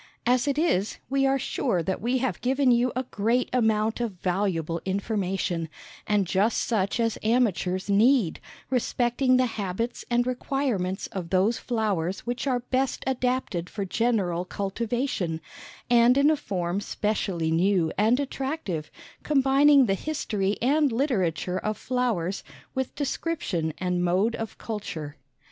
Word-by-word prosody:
As 250 +2 +2
it 280 0 0
is, 220 - +1
we 270 0 +3
are 270 0 +3
sure 240 -8 -1
that 190 +3 -2
we 245 +4 +1
have 260 0 -2
given 260 +1 +3
you 240 +1 +3
a 255 - 0
great 230 +5 +1
amount 220 -2 +2
of 230 -4 -2
valuable 175 -3 -1
information, 190 -4 -1 0.4
and 210 -2 +2
just 195 +6 +1
such 210 -1 0
as 230 -1 0
amateurs 205 -5 +1
need, 210 -1 +3 0.3
respecting 250 +1 +2
the 255 - +3
habits 225 +1 -3
and 240 0 +2
requirements 250 -7 -1
of 180 -4 -5
those 195 +6 +2
flowers 200 -6 -1
which 245 +3 -3
are 250 -2 +1
best 260 +2 -1
adapted 250 -8 -1
for 200 -2 -4
general 195 -4 0
cultivation, 200 -2 -2 0.5
and 240 +1 +5
in 285 +2 +5
a - - +3
form 185 - -2
specially 195 -6 -1
new 175 -1 +2
and 220 +6 +3
attractive, 270 - -3 0.3
combining 275 0 +5
the 195 - +1
history 205 -6 -2
and 290 +2 +3
literature 190 - 0
of 215 +2 -2
flowers, 225 -8 -1 0.3
with 265 -1 -3
description 275 - -2
and 180 -1 -1
mode 190 +6 +2
of 225 -1 -6
culture. 160 -9 -5
220 Hz, 140 wpm, -26 LUFS, 185-255 Hz, 0.5 s, and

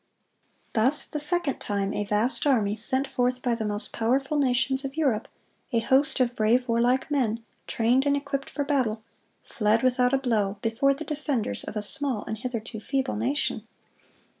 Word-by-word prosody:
Thus 260 +6 +4
the 300 - -5
second 300 -1 0
time 200 -1 -2
a 205 - -2
vast 215 +8 0
army, 215 -7 +2
sent 260 +5 +1
forth 250 -2 -1
by 245 - +1
the 225 -2 -2
most 205 +1 -3
powerful 270 +6 0
nations 265 0 +1
of 270 +2 -6
Europe, 260 -9 +1 0.4
a 235 - +1
host 265 +6 +2
of 245 -1 +1
brave, 235 +4 +2
warlike 245 +4 +1
men, 230 -5 0 0.2
trained 245 +5 +2
and 285 0 +3
equipped 275 -1 -4
for 285 - -2
battle, 250 -7 0 0.4
fled 220 +1 +1
without 250 -1 +3
a 270 - +3
blow, 215 -6 0
before 255 +5 +2
the 315 +3 -7
defenders 280 - -2
of - - -7
a 210 - -2
small 255 0 +1
and 220 -1 -5
hitherto 230 -2 -5
feeble 265 +4 -2
nation. 255 +7 -2
250 Hz, 170 wpm, -26 LUFS, 220-275 Hz, 0.4 s, Thus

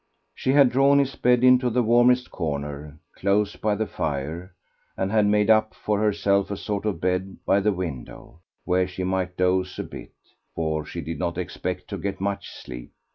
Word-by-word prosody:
She 130 - 0
had 140 -3 +6
drawn 140 +2 +4
his 140 -1 +1
bed 125 0 +3
into 125 0 +5
the 120 +1 +1
warmest 120 +2 +3
corner, 75 -2 -4 0.2
close 100 +1 +1
by 105 -1 0
the 110 - -1
fire, 80 +4 -4 0.4
and 95 +1 -1
had 105 -1 +3
made 105 +1 +3
up 110 0 +3
for 105 -1 -1
herself 100 -2 +1
a 100 - -3
sort 105 0 -3
of 100 -6 -2
bed 95 +2 -1
by 100 - +3
the 105 +2 +2
window, 85 -4 -7 0.3
where 90 0 +2
she 95 0 -5
might 90 -1 -2
doze 95 0 +1
a - - -3
bit, - - -11 0.4
for 80 -1 -1
she 85 +2 -6
did 80 0 -6
not - - -2
expect 90 0 -4
to - - -5
get 100 -1 -4
much 100 +1 -3
sleep. - - -10
95 Hz, 185 wpm, -24 LUFS, 90-110 Hz, 0.4 s, had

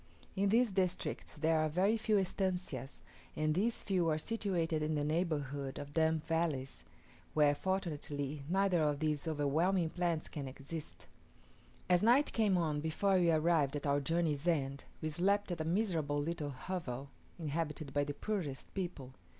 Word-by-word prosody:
In 200 0 +2
these 230 +1 +4
districts 185 -2 -1
there 160 +1 +2
are 155 0 +2
very 190 +8 +3
few 220 -1 +2
estancias, 180 - -2 0.3
and 155 0 +1
these 220 +8 0
few 180 -4 +1
are 155 - +2
situated 170 -5 -1
in 155 +1 0
the 145 - 0
neighbourhood 145 -4 -1
of 145 0 -7
damp 160 -1 +2
valleys, 160 -5 -1 0.5
where 150 -1 +5
fortunately 150 -5 -2
neither 190 -2 +3
of 150 -2 +2
these 150 0 -1
overwhelming 160 +4 +1
plants 170 -3 -1
can 145 -3 -5
exist. 140 +4 -7 0.8
As 180 -1 +4
night 245 +7 +4
came 210 -5 +3
on 155 -4 0
before 190 +5 +2
we 175 -1 +4
arrived 155 -3 +3
at 145 - -3
our 140 0 +3
journey's 160 +1 0
end, 140 -5 0 0.2
we 155 - 0
slept 200 +5 +1
at 170 - -2
a - - -2
miserable 165 -6 0
little 150 -1 -2
hovel 140 -2 -5 0.3
inhabited 155 -2 -3
by 145 - +2
the 145 0 -4
poorest 175 -11 -3
people. 170 -9 -4
160 Hz, 160 wpm, -34 LUFS, 145-185 Hz, 0.8 s, where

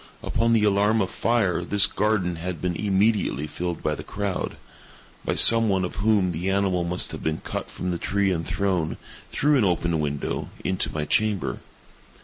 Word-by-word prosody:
Upon 115 +1 +1
the 110 -2 +3
alarm 105 +2 +3
of 95 -3 -1
fire, 100 -8 +1
this 100 +3 +4
garden 95 -5 0
had 90 +1 -5
been 90 -1 -2
immediately 100 -5 +1
filled 85 +3 -4
by 75 - 0
the - - -6
crowd—by 100 -2 -6
some 115 -1 +6
one 95 -2 +1
of 90 - -7
whom 100 -3 +2
the 85 +3 -3
animal 95 -2 +1
must 90 +1 -2
have - - -7
been 80 0 -1
cut - - -6
from 90 - -4
the 85 - -3
tree 100 -1 0
and 85 -2 -1
thrown, 95 -4 -1 0.3
through 150 0 +2
an - - +3
open 85 -3 +1
window, 75 -1 -3
into 95 0 -1
my 75 -1 -3
chamber. 105 +4 0
95 Hz, 175 wpm, -24 LUFS, 85-105 Hz, 0.3 s, some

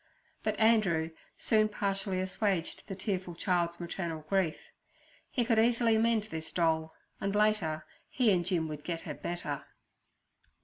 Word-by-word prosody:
But - - -1
Andrew 200 -8 +3 0.3
soon 215 -1 +3
partially 195 -2 -1
assuaged 190 -2 -1
the 195 - -5
tearful 185 -2 -3
child's 170 -1 0
maternal 170 -2 -4
grief; 185 -3 +1 0.7
he 245 - 0
could 230 -2 +3
easily 230 0 +4
mend 225 -1 +3
this 160 0 -4
doll, 160 -2 +1 0.2
and 195 +1 -1
later 205 -8 +2 0.2
he 245 -5 +3
and 180 -2 +3
Jim 170 -3 0
would 150 -1 -6
get 165 -2 -3
her - - -6
a - - -9
better. 150 -5 -3
185 Hz, 145 wpm, -31 LUFS, 165-215 Hz, 0.7 s, easily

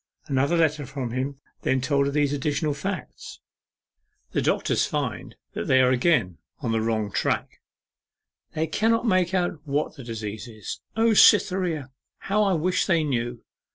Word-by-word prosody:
Another 140 +4 +1
letter 150 -4 +1
from 130 -3 -4
him 135 +3 -3 0.2
then 130 - +1
told 140 +1 +1
her - - -1
these 145 -1 +1
additional 145 +2 -1
facts: 180 +2 -6 0.9
'The - - 0
doctors - - +1
find - - -3 0.2
they 130 - +2
are 130 0 +4
again 125 - +2 0.2
on - - -2
the 115 0 +1
wrong 110 -2 -1
tack. - - -1 0.9
They 160 - +1
cannot 225 +8 +1
make 185 -4 +2
out 175 -3 0
what 150 +1 -2
the 135 - -8
disease 110 -2 -6
is. 110 -3 -8
O 225 0 +3
Cytherea! 180 - +4 0.3
how 210 +2 0
I 200 -2 +3
wish 180 +2 +1
they 170 -4 +3
knew! 120 -4 -2
145 Hz, 155 wpm, -25 LUFS, 125-175 Hz, 0.9 s, are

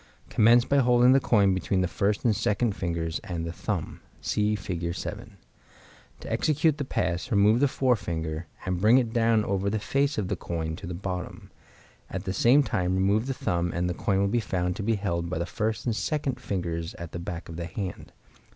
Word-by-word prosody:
Commence 120 +3 +5
by 140 - +2
holding 125 -1 +5
the 135 - +6
coin 100 -7 +3
between 95 0 0
the 90 - +1
first 100 +5 -1
and 110 -3 +4
second 105 +1 0
fingers 85 -2 -2
and 85 -2 -4
the 85 - -3
thumb. - - -4 0.2
(See 105 0 0
Fig. 85 -4 -3
7.) 85 - -7 0.8
To - - -7
execute 155 0 +2
the - - 0
pass, 90 -9 -2
remove 105 +2 +4
the 145 - +4
forefinger, 85 - -1 0.2
and 90 -1 -1
bring 110 +5 +6
it 120 -3 0
down 115 -2 +3
over 100 0 0
the 110 - 0
face 140 +7 0
of 105 -4 -1
the - - -1
coin 80 -2 -4
to - - -8
the 90 - -4
bottom; 90 0 -6 0.6
at 95 0 -4
the 95 - -3
same 125 +8 +5
time 95 -8 0
remove 100 +5 +2
the 135 - -2
thumb, 85 -4 -1
and 90 +1 0
the 90 - -1
coin 95 +2 0
will 100 - +2
be 120 +4 +1
found 90 -4 -1
to - - -3
be 115 +2 +1
held 85 -4 -2
by 90 - -2
the 85 - -1
first 110 +3 -2
and 115 -3 0
second 140 -1 -2
fingers 85 -7 -3
at 85 -2 -8
the 85 - -5
back 85 -1 -6
of 80 - -8
the 85 0 -4
hand. 95 +1 -6
100 Hz, 210 wpm, -27 LUFS, 85-115 Hz, 0.8 s, the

